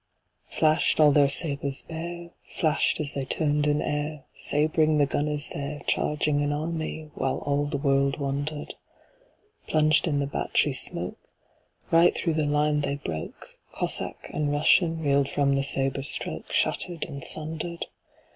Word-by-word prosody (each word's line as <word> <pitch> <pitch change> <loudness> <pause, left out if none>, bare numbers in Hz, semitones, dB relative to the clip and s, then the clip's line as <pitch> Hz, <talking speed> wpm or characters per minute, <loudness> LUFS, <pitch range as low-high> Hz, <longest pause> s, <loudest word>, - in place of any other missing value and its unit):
Flash'd 155 0 +2
all 150 -1 +7
their 140 -1 +5
sabres 140 -2 -2
bare, 170 +1 -7
Flash'd 155 -2 0
as 150 -2 -1
they 140 - -2
turn'd 145 +2 0
in 150 0 +2
airSabring 150 +1 +1
the 145 - +4
gunners 145 +1 -1
there, 145 +1 -5
Charging 150 -1 +1
an 145 0 0
army, 155 0 -4
whileAll 140 +2 -1
the 145 - -1
world 140 0 +1
wonder'd:Plunged 155 - -2
in 145 -3 +1
the 140 - 0
battery 140 - 0
smokeRight 170 +1 -1
thro' 165 - 0
the 155 -1 0
line 150 0 +2
they 140 0 -1
broke; 80 - -7
Cossack - - -3
and 150 -1 0
RussianReel'd 145 -2 +3
from 140 -1 +2
the 135 - +2
sabre 135 0 0
strokeShatter'd 165 +4 -2
and 140 -4 -8
sunder'd. 160 +2 -2
150 Hz, 125 wpm, -26 LUFS, 140-155 Hz, -, all